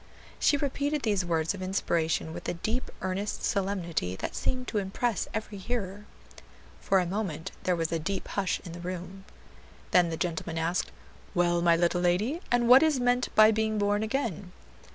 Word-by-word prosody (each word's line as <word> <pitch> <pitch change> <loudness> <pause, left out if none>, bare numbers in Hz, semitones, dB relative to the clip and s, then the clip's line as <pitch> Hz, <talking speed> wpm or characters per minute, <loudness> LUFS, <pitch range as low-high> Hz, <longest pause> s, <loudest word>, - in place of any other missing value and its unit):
'" - - -22
She 290 - +4
repeated 285 +1 -1
these 205 -4 +1
words 165 -1 0
of 200 - -8
inspiration 165 -4 0
with - - -5
a - - -2
deep, 220 +9 -2
earnest 190 +3 -3
solemnity 175 - -1
that - - -4
seemed 255 -1 -1
to 215 - 0
impress 205 +3 -1
every 215 -2 -4
hearer. 205 -2 -4 0.7
For 195 - +2
a 180 - +1
moment 180 -4 -3
there 180 - +3
was 165 -1 -1
a 165 - 0
deep 190 +4 -3
hush 195 -2 -1
in 170 - -7
the 170 - -8
room. 180 +2 -6 0.7
Then 175 -2 +5
the 160 - -3
gentleman 165 -1 -3
asked, 165 +2 -1 0.4
"Well, 175 -1 +2
my 170 -1 +5
little 175 +1 +1
lady, 205 - +1
and 240 -1 +3
what 255 +2 +9
is 310 -4 +3
meant 245 0 +2
by 215 0 +8
being 220 0 0
born 205 0 +1
again?" 220 - -2
190 Hz, 180 wpm, -28 LUFS, 175-220 Hz, 0.7 s, what